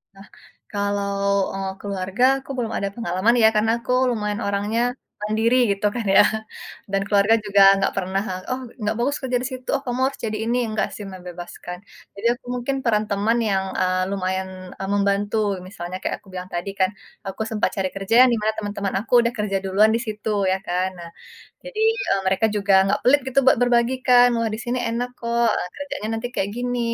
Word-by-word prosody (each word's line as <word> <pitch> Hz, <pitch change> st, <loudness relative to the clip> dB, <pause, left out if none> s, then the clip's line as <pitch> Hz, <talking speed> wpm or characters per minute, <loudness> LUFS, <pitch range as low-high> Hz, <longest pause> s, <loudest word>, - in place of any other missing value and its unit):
Nah, 195 Hz, +1 st, -14 dB, 0.4 s
kalau, 200 Hz, -1 st, -1 dB, 0.4 s
eee, 195 Hz, 0 st, -3 dB
keluarga, 195 Hz, +2 st, -2 dB, 0.2 s
aku 270 Hz, -, -9 dB
belum 230 Hz, -3 st, -2 dB
ada 200 Hz, -, -1 dB
pengalaman 225 Hz, 0 st, +1 dB
ya, -, -, +9 dB
karena 220 Hz, +1 st, +3 dB
aku 250 Hz, -, -4 dB, 0.2 s
lumayan 210 Hz, -1 st, -2 dB
orangnya 205 Hz, +3 st, 0 dB, 0.4 s
mandiri 220 Hz, +3 st, +2 dB
gitu 200 Hz, +1 st, -2 dB
kan 235 Hz, -3 st, -3 dB
ya -, -, +9 dB, 0.7 s
dan 195 Hz, 0 st, +1 dB
keluarga 205 Hz, +2 st, +4 dB
juga 200 Hz, -1 st, +3 dB
enggak 195 Hz, 0 st, 0 dB
pernah, 190 Hz, 0 st, -1 dB, 0.3 s
"Oh 255 Hz, +1 st, -2 dB, 0.2 s
enggak 210 Hz, 0 st, -1 dB
bagus 280 Hz, +4 st, +1 dB
kerja 255 Hz, -2 st, -2 dB
di -, -, -1 dB
situ, 255 Hz, 0 st, -8 dB
oh 275 Hz, -, -3 dB
kamu 245 Hz, 0 st, -2 dB
harus 275 Hz, -, -5 dB
jadi 215 Hz, -1 st, -2 dB
ini," 240 Hz, +1 st, +1 dB
enggak 215 Hz, 0 st, 0 dB
sih 210 Hz, -, -7 dB
membebaskan. 180 Hz, -1 st, -8 dB, 0.4 s
Jadi 200 Hz, +3 st, -1 dB
aku -, -, -33 dB
mungkin 250 Hz, +3 st, -2 dB
peran 215 Hz, -3 st, +2 dB
teman 205 Hz, +3 st, +1 dB
yang, 190 Hz, -1 st, +1 dB, 0.2 s
eee, 185 Hz, 0 st, +1 dB
lumayan, 190 Hz, -1 st, -2 dB, 0.3 s
eee, 195 Hz, -, -4 dB
membantu. 200 Hz, +1 st, +1 dB, 0.3 s
Misalnya 185 Hz, -2 st, -6 dB
kayak -, -, -2 dB
aku -, -, -23 dB
bilang 180 Hz, 0 st, -6 dB
tadi 175 Hz, +3 st, -3 dB
kan, 190 Hz, 0 st, +3 dB, 0.4 s
aku 195 Hz, +3 st, -5 dB
sempat 215 Hz, -1 st, +1 dB
cari 190 Hz, -2 st, -1 dB
kerja 195 Hz, +2 st, -3 dB
yang -, -, +3 dB
di 230 Hz, -, +1 dB
mana 215 Hz, +1 st, +1 dB
teman-teman 205 Hz, -2 st, -3 dB
aku 225 Hz, -, -7 dB
sudah 235 Hz, 0 st, 0 dB
kerja 210 Hz, -2 st, 0 dB
duluan 205 Hz, +3 st, +4 dB
di 230 Hz, -, 0 dB
situ, 215 Hz, 0 st, -4 dB, 0.2 s
ya 190 Hz, -, +2 dB
kan? 180 Hz, +1 st, 0 dB
Nah, 170 Hz, -, -8 dB, 0.5 s
jadi, -, -, -7 dB, 0.3 s
eee, 195 Hz, -, +2 dB
mereka 190 Hz, +4 st, +2 dB
juga 200 Hz, -1 st, +1 dB
enggak 195 Hz, -, +1 dB
pelit 275 Hz, +4 st, +5 dB
gitu 265 Hz, +1 st, +3 dB
buat 265 Hz, -, +6 dB
berbagi 245 Hz, +1 st, +3 dB
kan, 245 Hz, -1 st, +7 dB
"Wah 230 Hz, -1 st, 0 dB
di 215 Hz, -, -4 dB
sini 245 Hz, +1 st, -2 dB
enak 240 Hz, +2 st, -2 dB
kok 235 Hz, 0 st, +1 dB, 0.3 s
kerjanya 285 Hz, -7 st, -5 dB
nanti 245 Hz, -, -3 dB
kayak 195 Hz, -, 0 dB
gini, 245 Hz, 0 st, -2 dB
210 Hz, 195 wpm, -22 LUFS, 195-235 Hz, 0.7 s, ya